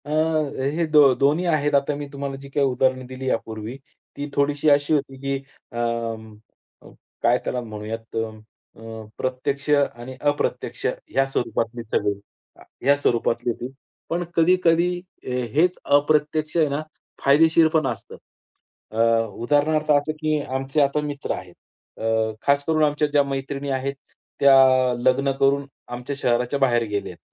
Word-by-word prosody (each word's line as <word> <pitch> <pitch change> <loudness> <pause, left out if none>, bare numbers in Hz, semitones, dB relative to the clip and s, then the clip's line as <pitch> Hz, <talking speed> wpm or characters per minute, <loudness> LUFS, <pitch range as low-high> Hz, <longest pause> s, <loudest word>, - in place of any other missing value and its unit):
अ, - - -9
हे 155 0 0
दो 145 -3 +7
दोन्ही 150 +7 +2
आहेत. 150 -4 +1
आता 140 +1 +1
मी 145 0 -6
तुम्हाला 140 -1 -4
जी 140 +1 -11
काही 140 0 +1
उदाहरण 130 0 +1
दिली 130 0 -4
यापूर्वी, 110 +1 -4 0.4
ती 145 +1 -4
थोडीशी 145 +2 +2
अशी 145 +1 +3
होती, 135 -2 -1
की 140 +1 -2 0.4
अं, 115 -2 -3 0.9
काय - - +4
त्याला 125 - -2
म्हणूयात 110 0 -7
अ, 115 - +1 0.6
अ, 110 -1 -9
प्रत्यक्ष 135 +3 -3
आणि 130 -3 0
अप्रत्यक्ष 145 0 -1
ह्या 135 - 0
स्वरूपातले 120 -3 -2
सगळे 105 -2 0 0.7
ह्या 140 +1 +6
स्वरूपातली 120 -3 0
होती, 120 +3 -6 0.4
पण 175 +1 -1
कधी-कधी 175 +1 +3 0.2
ए 125 0 -2
हेच 180 +4 +3
अप्रत्यक्ष 150 +2 +2
आहे 160 -2 +4
ना 140 +2 -2 0.4
फायदेशीर 160 +3 +5
पण 160 -1 +2
असतं. - - -6 0.8
अ, 110 - -5 0.4
उदाहरणार्थ 150 +3 +2
असं, 145 +1 +2
की 155 -1 +1
आमचे 135 +2 -1
आता 140 +1 +2
मित्र 145 -1 -4
आहेत 90 -1 -10 0.4
अ, - - -6 0.4
खास 140 0 +2
करून 155 -1 +2
आमच्या 150 0 +2
ज्या 145 -1 +3
मैत्रिणी 140 +1 -4
आहेत 135 +1 -2 0.4
त्या 140 -1 +7 0.4
लग्न 130 +3 +2
करून 140 +1 +3 0.2
आमच्या 125 +3 -5
शहराच्या 125 +2 0
बाहेर 120 -3 +3
गेले 100 -1 -2
आहेत. - - -15
140 Hz, 145 wpm, -23 LUFS, 125-150 Hz, 0.9 s, दो